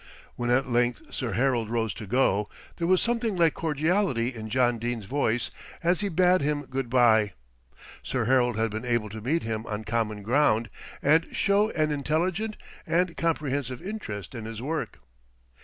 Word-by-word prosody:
When 120 0 -2
at 130 +2 +3
length 120 -1 0
Sir 120 -5 -2
Harold 120 0 +1
rose 115 -3 0
to 105 0 -8
go, 105 -4 +2 0.3
there 170 - -1
was 185 0 +4
something 235 -3 0
like 165 -3 +4
cordiality 155 - 0
in 110 -2 -7
John 120 0 +2
Dene's 120 -2 -3
voice, 120 -1 0 0.3
as 175 +2 +2
he 200 - 0
bade 180 +1 +4
him 145 0 0
good 130 -2 -3
bye. 110 -4 +4 0.7
Sir 125 -3 -2
Harold 125 -2 +3
had 110 0 0
been 110 +2 -4
able 120 -3 0
to 110 +2 -7
meet 155 +9 0
him 110 -1 -3
on 105 0 -4
common 110 -2 -2
ground, 115 -3 +2 0.3
and 160 +4 +4
show 200 +2 +3
an 155 -1 +1
intelligent 170 +9 -1 0.3
and 175 0 +1
comprehensive 140 -6 -1
interest 155 - -6
in 115 -3 -6
his 110 -1 -6
work. 155 +6 -4
125 Hz, 170 wpm, -27 LUFS, 115-165 Hz, 0.7 s, was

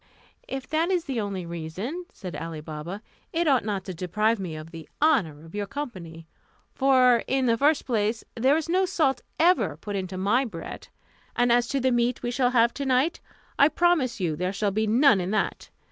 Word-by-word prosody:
"If 270 -1 -5
that 320 +3 +1
is 360 -3 0
the 255 -5 -2
only 195 -3 -4
reason," 170 - -5
said 180 -3 -8
Ali 165 -1 -5
Baba, 155 +7 -7 0.3
"it 335 0 0
ought 270 -4 +3
not 200 -3 -2
to 185 - -5
deprive 210 +6 0
me 175 -5 -5
of 155 +1 -9
the 165 -2 -10
honour 190 - +2
of 165 - -14
your 205 -1 -3
company; 180 - -7 0.5
for, 255 -3 +5
in 265 -1 +1
the 230 -2 +3
first 290 +5 +2
place, 220 -1 0
there 260 +5 +3
is 320 - -3
no 370 +2 +2
salt 285 -8 +1 0.2
ever 330 - +3
put 205 +5 -6
into 185 -1 -4
my 205 +8 +2
bread, 230 - -8 0.5
and 245 0 +3
as 240 0 +3
to 275 - -1
the 260 0 +2
meat 240 0 0
we 240 - -1
shall 245 0 +2
have 235 -1 +3
to 280 - -4
night, 265 +6 +2 0.4
I 280 - +8
promise 310 -8 +1
you 170 -5 -1
there 180 +4 -2
shall 200 0 0
be 215 +2 0
none 230 -2 +5
in 180 - -3
that. 215 +1 -2
230 Hz, 205 wpm, -26 LUFS, 185-270 Hz, 0.5 s, I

